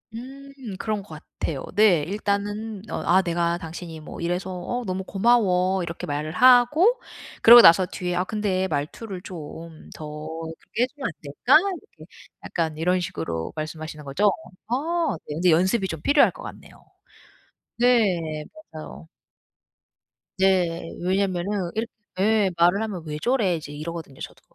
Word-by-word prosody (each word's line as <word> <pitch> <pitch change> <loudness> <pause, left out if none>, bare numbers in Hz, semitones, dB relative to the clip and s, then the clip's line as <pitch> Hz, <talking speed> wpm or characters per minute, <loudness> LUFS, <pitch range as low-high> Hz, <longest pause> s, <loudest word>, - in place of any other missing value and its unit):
음 270 +4 -9 0.3
그런 215 -2 -2
것 - - -20 0.3
같아요. 140 -5 -3
네. 205 -7 +5
일단은 205 +4 -3
어 - - -3
"아 185 +2 +5
내가 170 -1 -1
당신이 165 -1 -8
뭐 155 - -10
이래서 175 +2 -2
어 245 +7 -3
너무 185 0 -3
고마워." 190 -3 +2
이렇게 170 -1 -6
말을 150 +2 -3
하고 255 - +5 0.4
그러고 235 +1 +11
나서 180 +2 +7
뒤에 180 0 -4
"아 180 - +1
근데 190 -2 -1
말투를 180 +6 -4
좀 165 -2 -10
더 155 - -8 0.5
그렇게 235 - -2
해 250 - +1
주면 275 +1 -9
안 - - -4
될까?" 145 - +2
이렇게 330 - -7 0.3
약간 160 -3 -2
이런 180 +3 +1
식으로 80 - -4
말씀하시는 155 0 -6
거죠? 190 +9 +2 0.4
아 320 +7 0
네. 150 - -5
근데 175 +2 +3
연습이 190 +5 +2
좀 160 -3 -6
필요할 285 - +4
것 - - -13
같네요. - - -11 0.9
네 185 -11 +2 0.3
맞아요. 80 - -10 1.3
네. 180 -3 +1
왜냐면은 185 0 -1
이르 225 +2 0 0.3
예 210 0 +3
말을 175 +4 +4
하면 195 -6 -5
"왜 150 -1 -5
저래?" 230 -8 +1
이제 155 -2 -7
이러거든요 155 -2 -7
저도. - - -9
185 Hz, 290 characters per minute, -24 LUFS, 165-215 Hz, 1.3 s, 그러고